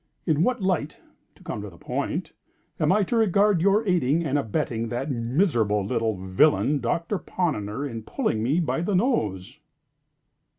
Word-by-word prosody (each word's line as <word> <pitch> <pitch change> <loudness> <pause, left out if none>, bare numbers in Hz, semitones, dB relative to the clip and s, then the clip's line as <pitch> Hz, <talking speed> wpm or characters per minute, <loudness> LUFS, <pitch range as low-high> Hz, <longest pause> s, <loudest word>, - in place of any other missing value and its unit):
In 155 -2 +2
what 245 +2 +1
light 170 -5 -1 0.4
(to - - -20
come - - -5
to - - -7
the - - -16
point) - - -3 0.5
am - - +3
I 205 +2 +3
to 215 - -2
regard 205 -3 +3
your 200 +4 +3
aiding 170 -2 +2
and 140 -2 -1
abetting 115 -3 -1
that 130 +5 -3
miserable 115 - +1
little 115 -2 -1
villain, 135 +10 +2
Doctor 165 - -1
Ponnonner, 140 - -2
in 115 -4 -6
pulling 110 0 -2
me 135 +9 +1
by 165 -1 -1
the 190 +3 0
nose?" 110 - -1
145 Hz, 160 wpm, -25 LUFS, 115-185 Hz, 0.5 s, am